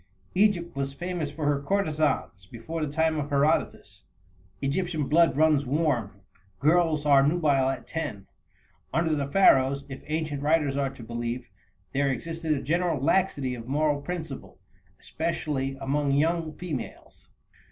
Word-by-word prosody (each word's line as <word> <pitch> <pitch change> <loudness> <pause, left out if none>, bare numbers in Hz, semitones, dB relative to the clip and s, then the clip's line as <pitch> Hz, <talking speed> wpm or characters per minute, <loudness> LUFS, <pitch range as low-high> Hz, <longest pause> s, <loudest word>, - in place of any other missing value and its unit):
Egypt 185 -4 +2
was 135 0 -2
famous 175 -3 -3
for 150 +1 -5
her 145 -1 +1
courtesans 155 - -1
before 155 - -5
the 145 - -3
time 160 +1 +1
of 145 0 -3
Herodotus. 145 +2 0 0.6
Egyptian 155 - -1
blood 165 -2 +4
runs 155 -2 +4
warm; 125 -9 -1 0.4
girls 155 -1 +2
are 140 -2 +6
nubile 140 -3 +2
at 135 - -4
ten. 105 - -5 0.7
Under 165 -1 +1
the 140 -2 -1
Pharaohs, 140 -4 +4
if 135 - -7
ancient 155 -2 -2
writers 150 -2 +2
are 140 -1 0
to 130 -3 -12
be - - -12
believed, 120 +1 -4 0.4
there 140 0 +1
existed 165 +3 -2
a 140 - -3
general 170 0 0
laxity 140 -3 +1
of 120 -1 -8
moral 145 +1 +1
principle, 155 - -6 0.4
especially 150 -4 -2
among 140 +1 0
young 160 +2 +1
females. 165 -8 -7
145 Hz, 140 wpm, -27 LUFS, 135-160 Hz, 0.7 s, are